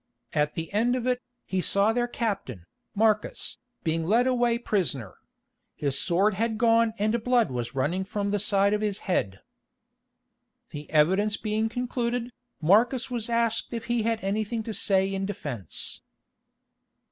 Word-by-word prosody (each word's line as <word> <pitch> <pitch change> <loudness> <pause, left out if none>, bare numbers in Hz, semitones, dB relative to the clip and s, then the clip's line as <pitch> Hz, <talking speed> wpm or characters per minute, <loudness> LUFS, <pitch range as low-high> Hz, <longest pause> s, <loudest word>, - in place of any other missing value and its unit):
At 150 0 +1
the 165 +3 -5
end 235 +4 +2
of 250 -2 -2
it, 250 0 +1 0.2
he 190 -1 -1
saw 200 +4 +2
their 240 +1 +1
captain, 195 - -3 0.3
Marcus, 215 0 +1 0.2
being 165 0 0
led 225 +9 +3
away 240 -2 +2
prisoner. 145 - -2 0.6
His 140 -2 -1
sword 190 +4 +2
had 220 +3 -1
gone 230 -1 +3
and 215 +2 0
blood 245 - +3
was 120 0 -4
running 165 +8 0
from 200 +1 -2
the 205 - +1
side 200 0 +3
of 210 - 0
his 205 -2 -1
head. 95 - -1 1.3
The 150 0 -8
evidence 190 +8 +3
being 215 +1 -1
concluded, 245 0 -2 0.3
Marcus 235 - +3
was 235 -2 -2
asked 230 0 0
if 230 -1 -4
he 240 -1 0
had 225 -1 -1
anything 215 +3 -1
to 220 - -5
say 195 -1 +2
in 195 0 -2
defence. 135 - -5
210 Hz, 150 wpm, -27 LUFS, 185-230 Hz, 1.3 s, led